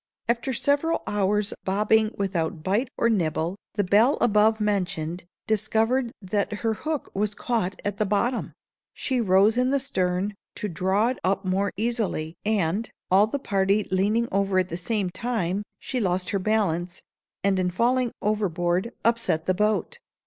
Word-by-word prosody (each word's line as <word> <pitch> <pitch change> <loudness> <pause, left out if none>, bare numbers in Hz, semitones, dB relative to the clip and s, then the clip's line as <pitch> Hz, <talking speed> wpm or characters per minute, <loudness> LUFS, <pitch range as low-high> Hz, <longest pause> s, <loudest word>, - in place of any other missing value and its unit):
After 235 +3 0
several 285 +6 +1
hours' 205 0 0
bobbing, 215 +3 +2
without 170 -5 -2
bite 210 +8 0
or - - +3
nibble, 170 -4 0 0.2
the 205 - +2
belle 215 +9 +4
above 220 0 +3
mentioned 185 -5 -1 0.2
discovered 225 +3 +1
that 200 +2 -1
her 225 - +2
hook 305 +6 -4
was 205 +1 -1
caught 210 -6 -2
at 205 -1 -2
the 215 - +1
bottom. 235 +5 0 0.4
She 260 -3 0
rose 200 +2 +4
in 250 +1 +3
the 280 +1 +2
stern, 185 -5 -1 0.2
to 210 - -3
draw 190 +6 +1
it 255 - -3
up 190 +1 0
more 190 +2 0
easily, 215 -8 -1
and, 205 0 0 0.2
all 200 +3 +6
the 255 - -2
party 200 -4 +1
leaning 210 +5 +2
over 195 -1 +1
at 185 -1 +2
the 170 - -4
same 190 +1 -1
time, 195 -2 -1 0.2
she 255 - -3
lost 185 -3 0
her 200 - 0
balance, 185 -4 0 0.4
and, 195 -1 +2
in 180 -1 +1
falling 240 +6 +1
overboard, 185 -1 0
upset 230 -9 +2
the 185 - +2
boat. 215 - 0
205 Hz, 155 wpm, -25 LUFS, 185-225 Hz, 0.4 s, all